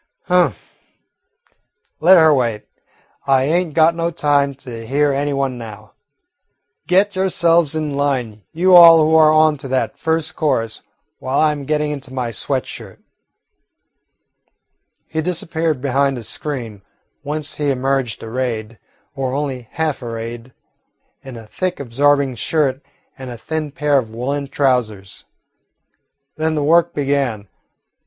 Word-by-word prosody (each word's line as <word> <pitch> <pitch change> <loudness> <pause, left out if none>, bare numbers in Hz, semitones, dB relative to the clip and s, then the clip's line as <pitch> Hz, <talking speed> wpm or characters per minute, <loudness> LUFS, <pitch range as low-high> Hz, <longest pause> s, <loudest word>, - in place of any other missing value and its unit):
"Humph. 180 0 0 1.3
Let 180 +4 +6
her 160 -2 +6
wait. 120 -6 -1 0.6
I 135 -1 +3
ain't 165 +2 0
got 160 +1 +5
no 170 0 -1
time 145 -4 +1
to 125 -4 -9
hear 145 +2 +1
any 145 +1 -1
one 135 -3 -2
now. 110 -2 -11 0.9
Get 195 +2 +2
yourselves 170 -4 +2
in 155 -2 -2
line, 130 -7 -2
you 180 +3 +4
all 165 -2 +9
who 160 - +1
are 155 -1 +6
on 155 -1 +4
to 135 - -7
that 130 0 -2
first 160 -1 -1
chorus, 125 -8 -1 0.4
while 130 +2 -1
I 155 -1 +4
'm 150 -1 -5
getting 150 +1 -1
into 135 -3 -7
my 125 -3 -3
sweat 110 - -2
shirt." - - -10 2.1
He 160 - -2
disappeared 160 -3 -2
behind 135 0 0
a 120 - -7
screen, 115 -3 -6 0.4
whence 150 0 -5
he 145 -1 -1
emerged 135 -2 -1
arrayed, 115 -2 -4 0.3
or 135 -1 -3
only 135 -5 -4
half 155 -3 -2
arrayed, 115 +1 -7 0.7
in 130 -3 -10
a 115 - -11
thick 185 - -4
absorbing 140 +1 +1
shirt 135 +2 -1 0.4
and 130 -1 -7
a 120 - -7
thin 155 +3 -4
pair 145 -1 +1
of 115 -4 -6
woollen 135 +5 -3
trousers. 125 -8 -1 1.1
Then 155 0 -1
the 150 - -1
work 170 +3 +3
began. 135 -7 -1
140 Hz, 135 wpm, -18 LUFS, 125-155 Hz, 2.1 s, all